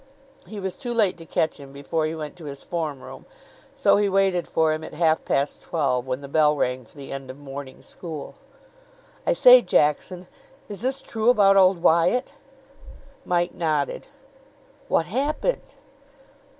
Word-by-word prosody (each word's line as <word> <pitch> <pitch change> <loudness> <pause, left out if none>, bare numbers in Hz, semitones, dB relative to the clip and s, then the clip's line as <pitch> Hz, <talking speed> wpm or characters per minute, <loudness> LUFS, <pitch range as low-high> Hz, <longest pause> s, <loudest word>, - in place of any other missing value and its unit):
He 215 - -7
was 190 -1 -4
too 240 -3 -5
late 210 -5 +2
to 165 - -12
catch 155 0 -1
him 140 -1 -11
before 155 +3 -2
he 160 - -4
went 155 0 -7
to 165 - -11
his 140 -1 -8
form 155 -6 -4
room, - - -11 0.5
so - - +4
he 205 -1 +2
waited 190 -2 +1
for 160 -1 +1
him 155 0 -5
at - - -9
half 160 0 +2
past 140 +1 -1
twelve, 130 -6 -1
when 130 +1 -3
the 140 - -8
bell 150 +1 +3
rang 125 -3 -2
for 130 - -22
the 140 -1 -9
end 135 -1 -7
of 130 - -8
morning 140 -1 -9
school. 160 -5 -8 0.9
"I - - +4
say, - - +8
Jackson, 175 +5 0 0.4
is 205 -1 -8
this 265 +2 -2
true 225 +1 0
about 200 -5 +5
old 185 -2 +4
Wyatt?" 170 +10 +2 0.9
Mike 175 0 0
nodded. 155 -4 -2 0.8
"What 165 - +1
happened?" 285 - -2
165 Hz, 165 wpm, -24 LUFS, 145-195 Hz, 0.9 s, say